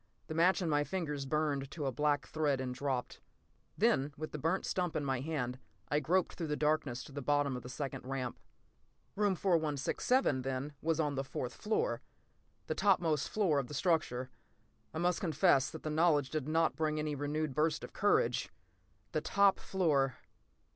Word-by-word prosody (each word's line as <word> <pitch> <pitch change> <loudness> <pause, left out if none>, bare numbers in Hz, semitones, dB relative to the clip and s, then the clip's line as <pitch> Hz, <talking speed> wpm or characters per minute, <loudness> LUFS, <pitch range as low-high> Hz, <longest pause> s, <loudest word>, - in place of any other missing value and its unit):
The - - -5
match 180 +4 +3
in - - -1
my 145 -2 +2
fingers 150 -5 -3
burned 145 -2 0
to 150 -1 -5
a 135 - 0
black 145 +2 +1
thread 150 -4 0
and 130 -1 -3
dropped. 130 -1 -3 0.6
Then, 195 - +3
with 155 +1 -5
the 150 - -5
burnt 165 +6 0
stump 180 -3 -1
still - - 0
in - - -4
my 135 -2 0
hand, 130 -4 -3 0.3
I 145 - +2
groped 175 +5 +1
through 165 - -4
the 150 - 0
darkness 150 -5 0
to - - -12
the 140 +1 -5
bottom 145 0 +1
of 125 - -5
the 125 - -9
second 135 -1 -5
ramp. 130 -2 -3 0.8
Room 205 -2 +2
4167, 160 - +1
then, 135 +3 -3
was 165 0 0
on 150 -2 +1
the 135 0 -1
fourth 125 -2 -4
floor—the 155 - -4
topmost 170 -7 +2
floor 185 -9 +2
of 130 - -3
the 150 - -7
structure. 135 -8 0 0.6
I - - -6
must 175 +1 +1
confess 160 -5 +3
that 160 - -9
the 155 - -2
knowledge 150 -4 +3
did 155 -3 -2
not 160 +1 +2
bring 155 -1 0
any 150 0 -1
renewed 145 +1 -2
burst 150 +2 +1
of - - -8
courage! - - +2 0.6
The 155 - 0
top 200 +4 +3
floor! 145 - +1
150 Hz, 180 wpm, -33 LUFS, 135-165 Hz, 0.8 s, match